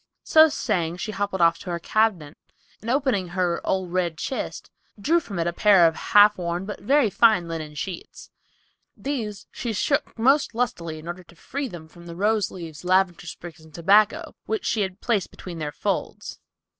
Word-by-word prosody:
So 315 Hz, 0 st, +6 dB
saying 175 Hz, -, -1 dB
she 215 Hz, -, -4 dB
hobbled 200 Hz, -2 st, -2 dB
off 165 Hz, 0 st, +4 dB
to 190 Hz, -, -8 dB
her 170 Hz, -, -1 dB
cabin 175 Hz, -5 st, 0 dB, 0.5 s
and 225 Hz, -, -6 dB
opening 255 Hz, -8 st, +1 dB
her 175 Hz, -1 st, -1 dB
"old 185 Hz, -2 st, -2 dB
red 175 Hz, -3 st, 0 dB
chist," 265 Hz, -, -5 dB, 0.3 s
drew 325 Hz, +12 st, +3 dB
from 210 Hz, -, -8 dB
it 165 Hz, -, 0 dB
a 170 Hz, -, -1 dB
pair 195 Hz, -2 st, +5 dB
of 160 Hz, -1 st, +3 dB
half 210 Hz, -1 st, +5 dB
worn, 175 Hz, +1 st, -3 dB
but 205 Hz, -, -6 dB
very 265 Hz, 0 st, +3 dB
fine 215 Hz, -7 st, +4 dB
linen 155 Hz, -2 st, -6 dB
sheets. 175 Hz, +4 st, -7 dB, 0.7 s
These 220 Hz, -8 st, -4 dB
she 235 Hz, -3 st, -4 dB
shook 285 Hz, +8 st, -1 dB
most 265 Hz, +1 st, +3 dB
lustily 170 Hz, -10 st, -2 dB
in 155 Hz, -, -11 dB
order 175 Hz, +1 st, -6 dB
to 175 Hz, -, -19 dB
free 280 Hz, -, -5 dB
them 175 Hz, -7 st, -10 dB
from 170 Hz, +1 st, -15 dB
the 170 Hz, -, -8 dB
rose 210 Hz, +1 st, +1 dB
leaves, 165 Hz, -4 st, -9 dB
lavender 180 Hz, -1 st, +1 dB
sprigs 170 Hz, -1 st, -10 dB
and 160 Hz, -1 st, -16 dB
tobacco, 200 Hz, +5 st, +3 dB
which 440 Hz, -3 st, -2 dB
she 220 Hz, -, 0 dB
had 190 Hz, 0 st, -4 dB
placed 215 Hz, -7 st, 0 dB
between 175 Hz, -3 st, -9 dB
their 150 Hz, -1 st, -3 dB
folds. -, -, -4 dB
185 Hz, 185 wpm, -24 LUFS, 170-220 Hz, 0.7 s, So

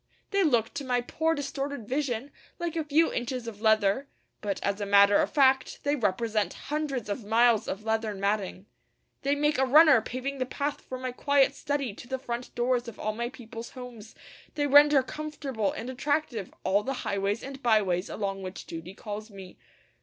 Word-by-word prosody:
They 395 Hz, 0 st, +2 dB
look 235 Hz, -8 st, +2 dB
to 285 Hz, 0 st, -4 dB
my 250 Hz, -2 st, +1 dB
poor 320 Hz, +6 st, 0 dB
distorted 280 Hz, -4 st, -4 dB
vision 270 Hz, -1 st, -2 dB, 0.3 s
like 340 Hz, -1 st, -3 dB
a 325 Hz, -, 0 dB
few 305 Hz, +2 st, +2 dB
inches 245 Hz, 0 st, -3 dB
of 210 Hz, -2 st, -8 dB
leather; 220 Hz, +3 st, +3 dB, 0.3 s
but 205 Hz, -2 st, -2 dB
as 200 Hz, +1 st, -1 dB
a -, -, -1 dB
matter 200 Hz, 0 st, +6 dB
of -, -, 0 dB
fact 265 Hz, -2 st, +3 dB
they 285 Hz, +1 st, +1 dB
represent 215 Hz, -2 st, 0 dB, 0.2 s
hundreds 290 Hz, -7 st, -2 dB
of 210 Hz, +3 st, -3 dB
miles 225 Hz, +1 st, +3 dB
of 200 Hz, -, -4 dB
leathern 220 Hz, -2 st, -1 dB
matting. 200 Hz, -1 st, -1 dB, 0.6 s
They 280 Hz, +1 st, +1 dB
make 295 Hz, -1 st, +1 dB
a -, -, +4 dB
runner 300 Hz, -2 st, +7 dB
paving 260 Hz, +4 st, -4 dB
the 255 Hz, -, -1 dB
path 285 Hz, +2 st, -3 dB
from 255 Hz, 0 st, -7 dB
my 255 Hz, -, -2 dB
quiet 280 Hz, +1 st, +3 dB
study 280 Hz, -6 st, -2 dB
to 240 Hz, -, -12 dB
the 265 Hz, +1 st, -2 dB
front 245 Hz, -1 st, -6 dB
doors 245 Hz, 0 st, +1 dB
of 230 Hz, -, -8 dB
all 215 Hz, -, -1 dB
my 235 Hz, +2 st, -3 dB
people's 235 Hz, -2 st, -9 dB
homes; 245 Hz, -4 st, -10 dB, 0.4 s
they 290 Hz, -, +1 dB
render 290 Hz, -1 st, +7 dB
comfortable 275 Hz, -7 st, -3 dB
and 235 Hz, -, -6 dB
attractive 260 Hz, -, -2 dB
all 195 Hz, +2 st, +2 dB
the 270 Hz, +5 st, -3 dB
highways 200 Hz, +2 st, -1 dB
and 275 Hz, 0 st, -8 dB
byways 200 Hz, -7 st, +2 dB
along 195 Hz, -2 st, -3 dB
which 185 Hz, 0 st, -7 dB
duty 165 Hz, +3 st, -8 dB
calls 210 Hz, +1 st, -7 dB
me. 190 Hz, -3 st, -11 dB
245 Hz, 185 wpm, -28 LUFS, 210-280 Hz, 0.6 s, runner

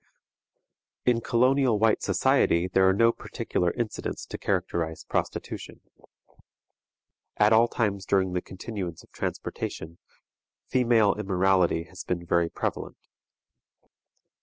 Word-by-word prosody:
In 120 Hz, -2 st, +3 dB
colonial 125 Hz, 0 st, +3 dB
white 110 Hz, +1 st, +2 dB
society 85 Hz, +2 st, +2 dB
there 95 Hz, +1 st, +3 dB
are -, -, +4 dB
no 115 Hz, +4 st, +4 dB
particular 90 Hz, -5 st, -2 dB
incidents 115 Hz, +2 st, -4 dB
to -, -, -7 dB
characterize 80 Hz, -2 st, -2 dB
prostitution. -, -, -4 dB, 1.6 s
At 105 Hz, +1 st, +5 dB
all 115 Hz, +2 st, +5 dB
times 100 Hz, -5 st, -2 dB
during 95 Hz, -2 st, +1 dB
the 90 Hz, -, -1 dB
continuance 95 Hz, -3 st, -6 dB
of -, -, -23 dB
transportation, 85 Hz, +2 st, -5 dB, 0.7 s
female 115 Hz, -5 st, +3 dB
immorality 95 Hz, -4 st, +1 dB
has -, -, -10 dB
been 85 Hz, -1 st, -3 dB
very 85 Hz, 0 st, +1 dB
prevalent. -, -, -4 dB
95 Hz, 110 wpm, -26 LUFS, 90-115 Hz, 1.6 s, At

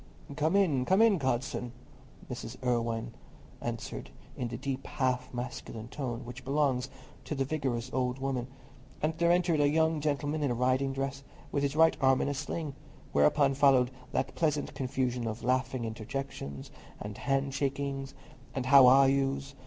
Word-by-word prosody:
"Come 155 Hz, +5 st, +1 dB
in, 160 Hz, -10 st, +3 dB
come 190 Hz, +9 st, +3 dB
in, 225 Hz, -5 st, +5 dB
godson!" 125 Hz, -2 st, -1 dB, 0.5 s
Mrs. 125 Hz, -1 st, -6 dB
Irwine 115 Hz, -1 st, -1 dB, 0.5 s
answered, -, -, -5 dB, 0.3 s
in 125 Hz, -, -3 dB
the 115 Hz, 0 st, -5 dB
deep 135 Hz, -1 st, -4 dB
half 130 Hz, -1 st, -1 dB
masculine 120 Hz, -2 st, -6 dB
tone 125 Hz, -4 st, -4 dB
which 125 Hz, +2 st, -8 dB
belongs 135 Hz, -2 st, +1 dB, 0.4 s
to 150 Hz, -, -3 dB
the 135 Hz, -1 st, 0 dB
vigorous 130 Hz, -4 st, -2 dB
old 125 Hz, -1 st, 0 dB
woman, 135 Hz, -2 st, -2 dB, 0.6 s
and 155 Hz, +1 st, +2 dB
there 170 Hz, 0 st, +4 dB
entered 175 Hz, -3 st, +3 dB
a 145 Hz, 0 st, +4 dB
young 160 Hz, 0 st, +2 dB
gentleman 145 Hz, +1 st, -1 dB
in 145 Hz, -, +1 dB
a 120 Hz, -, 0 dB
riding 130 Hz, +2 st, +1 dB
dress, 135 Hz, 0 st, -3 dB, 0.3 s
with 140 Hz, -, 0 dB
his 140 Hz, 0 st, 0 dB
right 160 Hz, +1 st, +5 dB
arm 130 Hz, -1 st, +4 dB
in -, -, 0 dB
a -, -, 0 dB
sling; 145 Hz, +2 st, -4 dB, 0.4 s
whereupon 135 Hz, -, +4 dB
followed 130 Hz, -2 st, +4 dB, 0.2 s
that 130 Hz, 0 st, -1 dB
pleasant 150 Hz, -3 st, 0 dB
confusion 125 Hz, -2 st, -1 dB
of 110 Hz, +2 st, -5 dB
laughing 130 Hz, 0 st, 0 dB
interjections, 110 Hz, -, -5 dB, 0.3 s
and 105 Hz, 0 st, -7 dB
hand 135 Hz, 0 st, 0 dB
shakings, 140 Hz, -1 st, -2 dB, 0.4 s
and 130 Hz, -2 st, -2 dB
"How 135 Hz, -1 st, +8 dB
are 135 Hz, +2 st, +7 dB
you's?" 135 Hz, 0 st, 0 dB
135 Hz, 160 wpm, -30 LUFS, 125-145 Hz, 0.6 s, How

